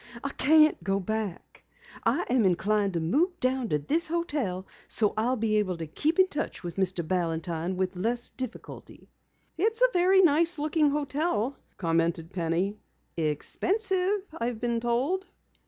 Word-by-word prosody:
I 280 - -2
can't 305 - +4
go 195 +2 0
back. 210 -1 -5 0.4
I - - +1
am 250 -2 +2
inclined 200 +2 +1
to 170 - 0
move 325 - 0
down 255 -2 0
to 150 - +2
this 310 - +1
hotel 290 - -2 0.2
so 210 -3 +2
I'll 235 +4 +1
be 215 -1 +1
able 185 -4 -1
to 165 - -5
keep 300 - -1
in 375 0 +6
touch 295 - -4
with 175 0 -6
Mr. 185 -3 -1
Balantine 170 0 -1
with 185 0 -1
less 235 +6 -1
difficulty." 255 -3 -8 0.5
"It's 445 +5 +2
a - - +4
very 375 +2 +5
nice 335 +1 +4
looking 300 0 +2
hotel," 285 -3 -1 0.2
commented 165 0 0
Penny. 180 +4 -1 0.4
"Expensive, 380 - 0
I've 235 -4 -3
been 235 -1 -1
told." 265 +12 -1
235 Hz, 150 wpm, -27 LUFS, -, 0.5 s, in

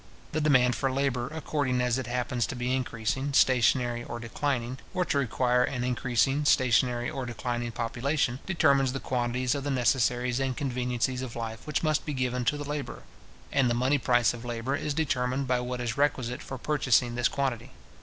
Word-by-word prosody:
The 155 - -1
demand 125 -5 +4
for 135 -1 0
labour, 130 -2 0
according 145 -5 -1
as 125 0 +1
it 130 - -5
happens 125 -1 -1
to - - -5
be 125 +1 -1
increasing, 130 +2 -2
stationary, 120 -1 +3
or 120 - -6
declining, 125 +1 -2 0.2
or 180 -1 +1
to 140 - +1
require 125 -1 +2
an 125 -1 -2
increasing, 125 +3 +1
stationary, 125 -2 +3
or 130 -2 -4
declining 120 0 -3
population, 125 +3 -1
determines 140 -8 +3
the 135 - -3
quantities 125 0 -1
of 140 -2 -3
the 145 - -2
necessaries 125 -1 +1
and 135 -1 -1
conveniencies 125 -2 -1
of 130 -3 -6
life 115 +2 -6
which 150 +1 -1
must 155 -1 +1
be 150 - -4
given 125 -1 -1
to 145 - +1
the 145 -1 -6
labourer; 145 -1 -5 0.5
and 135 -3 +3
the 120 - +1
money 130 +4 +2
price 120 -2 +3
of 120 -1 -8
labour 120 +3 -2
is 145 0 -3
determined 135 -3 0
by 125 -1 +2
what 125 0 -4
is 120 -2 -3
requisite 130 -3 0
for 130 - -7
purchasing 125 -4 +2
this 120 +1 +2
quantity. 130 -3 -2
125 Hz, 185 wpm, -28 LUFS, 120-135 Hz, 0.5 s, demand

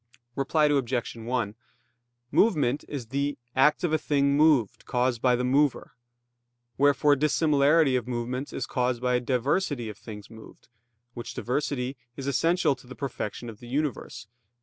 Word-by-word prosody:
Reply 150 +3 +2
Obj. 130 -5 0
1: 115 -2 -2 0.8
Movement 150 - +2
is 130 -6 -6
"the 140 +2 -1 0.2
act 150 +5 +4
of 170 -3 0
a 155 - +3
thing 140 -2 +1
moved, 145 -8 +3
caused 125 -2 0
by 125 -1 +4
the 125 - -1
mover." 135 +2 +1 0.8
Wherefore 145 +1 +4
dissimilarity 150 0 +3
of 125 -2 -1
movements 125 +3 -3
is - - -3
caused 125 -2 -1
by 125 0 +1
diversity 130 - -1
of 105 0 -10
things 105 -3 -9
moved, 110 -1 -15 0.4
which 120 0 -7
diversity 130 0 -2 0.2
is 135 - -5
essential 165 +4 +2
to 130 - -17
the 130 - -10
perfection 120 -3 -5
of 110 -2 -9
the 120 - -12
universe 135 -2 -3
(Q. 105 - -46
130 Hz, 150 wpm, -27 LUFS, 120-145 Hz, 0.8 s, act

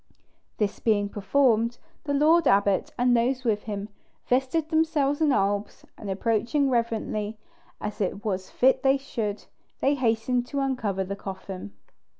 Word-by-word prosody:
This 210 -1 -1
being 205 -3 +1
performed, 230 +2 +2 0.3
the 285 - -1
lord 315 +2 +4
abbot 200 -1 +3
and 245 0 +3
those 250 +2 +1
with 215 -4 0
him 205 -2 -4 0.4
vested 265 +5 +1
themselves 315 -3 +1
in 305 -2 +4
albs; 200 -2 -1
and 205 - -8
approaching 230 +7 +1
reverently, 225 -2 -1 0.4
as 210 +1 -5
it 200 +2 -2
was 190 -3 -2
fit 260 +1 +3
they 270 0 +4
should, 220 -6 -4 0.3
they 275 - +3
hastened 245 -1 0
to 280 +2 -3
uncover 235 -8 -1
the 195 +1 -4
coffin. 190 - -7
230 Hz, 145 wpm, -26 LUFS, 205-270 Hz, 0.4 s, lord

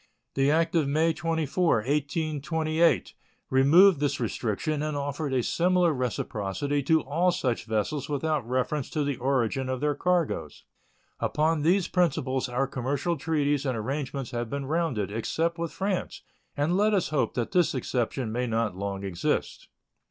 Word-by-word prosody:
The 135 +1 +2
act 165 +2 +2
of 160 -5 +2
May 160 +3 +2
24, 165 0 +1
1828, 155 +3 0 0.4
removed 155 +7 +6
this 145 -1 0
restriction 120 +5 -2
and 155 -1 -2
offered 145 +1 -3
a 130 -2 +1
similar 175 +1 +2
reciprocity 125 +1 -2
to 160 +4 +3
all 165 +7 +1
such 130 -11 -1
vessels 115 +7 -1
without 145 -4 -1
reference 130 +2 -1
to 150 - -1
the 140 -3 -2
origin 130 0 0
of 130 -1 -2
their 150 +1 +1
cargoes. 165 - -1 0.6
Upon 155 +1 +1
these 180 +4 +3
principles 135 -7 0
our 125 +3 0
commercial 135 +6 -2
treaties 145 -2 0
and 130 -4 -1
arrangements 135 +2 -3
have 120 -1 -3
been 140 +1 -3
rounded, 135 - -1
except 165 - -1
with 170 -1 -2
France, 195 -1 -3 0.3
and 150 +5 +1
let 210 +2 +3
us 190 - 0
hope 150 -2 0
that 120 -3 -2
this 175 -5 +2
exception 125 -1 -2
may 125 +2 -1
not 115 -3 -1
long 100 0 -4
exist. 90 -3 -2
145 Hz, 150 wpm, -27 LUFS, 125-160 Hz, 0.6 s, removed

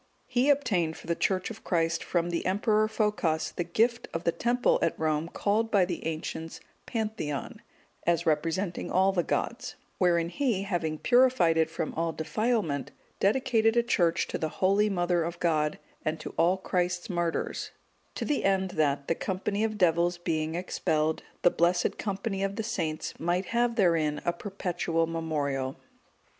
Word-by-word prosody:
He 255 +3 +1
obtained 185 - +2
for - - -13
the 170 - +1
Church 185 +4 0
of 225 0 -10
Christ 165 -2 0
from 175 -1 0
the 170 - -1
Emperor 210 +3 +2
Phocas 210 -8 0
the 175 - -2
gift 230 +8 +1
of 165 - -2
the 170 - +2
temple 240 +6 +2
at 165 - +1
Rome 155 +1 0
called 215 +4 0
by 200 -4 +4
the 175 -1 -4
ancients 160 0 -5 0.3
Pantheon, 215 - -3 0.5
as 170 -1 +2
representing 165 +4 0
all 190 +1 +3
the 185 -2 +1
gods; - - -2 0.2
wherein 170 -2 +3
he, 235 -4 0
having 170 -5 -2
purified 245 -7 +4
it 160 -1 +2
from 160 -1 -3
all 165 0 -1
defilement, 160 - -1 0.3
dedicated 225 +1 +2
a 235 - +5
church 175 -8 +2
to - - -3
the 160 - -1
holy 200 +5 +2
Mother 175 -3 +1
of 170 +1 -5
God, 155 -3 +1 0.3
and 155 +1 -1
to - - -7
all 175 +3 +3
Christ's 180 -1 -1
martyrs, 175 -2 -2 0.5
to - - -3
the 295 - 0
end 190 -1 +2
that, 145 -3 0
the - - +2
company 200 +4 -2
of 215 -1 -1
devils 175 -1 +3
being 160 -2 -2
expelled, 160 -3 0 0.2
the 175 - +6
blessed 175 +1 +1
company 195 -1 -2
of 195 0 -1
the 220 - -2
saints 165 -9 -3
might 175 +3 0
have 235 +2 +1
therein 165 -7 +2
a 175 - +1
perpetual 175 -3 -1
memorial. 145 -5 -2
175 Hz, 165 wpm, -28 LUFS, 165-205 Hz, 0.5 s, the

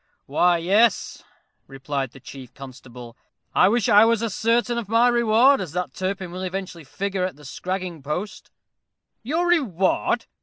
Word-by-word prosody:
"Why, 175 +5 +2
yes," 200 +6 +1 0.4
replied 135 0 -4
the 135 - -15
chief 130 -1 -12
constable. 125 -3 -11 0.4
"I - - +5
wish 235 0 +1
I 205 +1 +7
was 230 0 +2
as 225 -4 -2
certain 235 +1 +1
of 215 -4 -8
my 230 +2 +4
reward 240 +2 +4
as 170 -5 -6
that 180 0 -3
Turpin 190 -1 -4
will 180 +1 -7
eventually 185 -2 -5
figure 190 +6 -3
at 185 -4 -3
the 150 +1 -16
scragging 180 +2 -5
post." 180 +7 -5 0.7
"Your 315 +9 -1
reward!" 235 - +1
190 Hz, 155 wpm, -23 LUFS, 155-230 Hz, 0.7 s, I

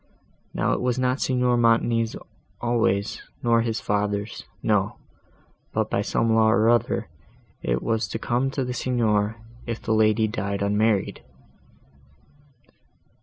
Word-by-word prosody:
Now - - +1
it - - -1
was 125 0 0
not 130 +1 0
Signor 125 -1 +2
Montoni's 115 -1 +2 0.4
always, 110 -4 0 0.2
nor 115 -1 +4
his 115 -1 -1
father's; 105 +1 -2 0.2
no; 105 -2 +1 0.8
but, - - -1
by - - +1
some 115 -1 +1
law 110 0 +4
or 110 0 +4
other, 120 -2 +1 0.5
it - - -1
was 115 -1 0
to - - -4
come 120 +4 0
to 135 -1 -2
the 125 - -3
Signor, 110 -4 +1 0.3
if 115 -1 -3
the 110 - -1
lady 110 0 +3
died 100 -2 -3
unmarried." 105 0 +1
115 Hz, 130 wpm, -24 LUFS, 105-120 Hz, 0.8 s, nor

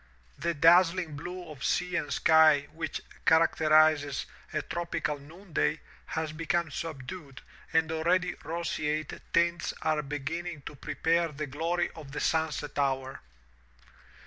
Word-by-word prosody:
The 170 -1 -1
dazzling 170 +1 +5
blue 180 +4 -6
of 140 -4 -9
sea 180 +1 0
and 150 - -1
sky 160 -3 +5
which 160 -2 -4 0.2
characterizes 155 -3 +4 0.3
a - - -1
tropical 170 -4 -2
noonday 155 0 -2 0.3
has 160 -1 -2
become 165 0 -1
subdued 140 -2 -6 0.3
and 160 0 +2
already 175 +3 +1
roseate 155 -2 -2
tints 170 0 +1
are 155 -1 +1
beginning 150 +2 -4
to - - -7
pre - - -6
pare 170 +1 +2
the 155 -1 -5
glory 165 +5 -1
of 145 -4 -11
the - - -3
sunset 155 -3 -1
hour. 135 -1 -1
160 Hz, 125 wpm, -29 LUFS, 150-170 Hz, 0.3 s, dazzling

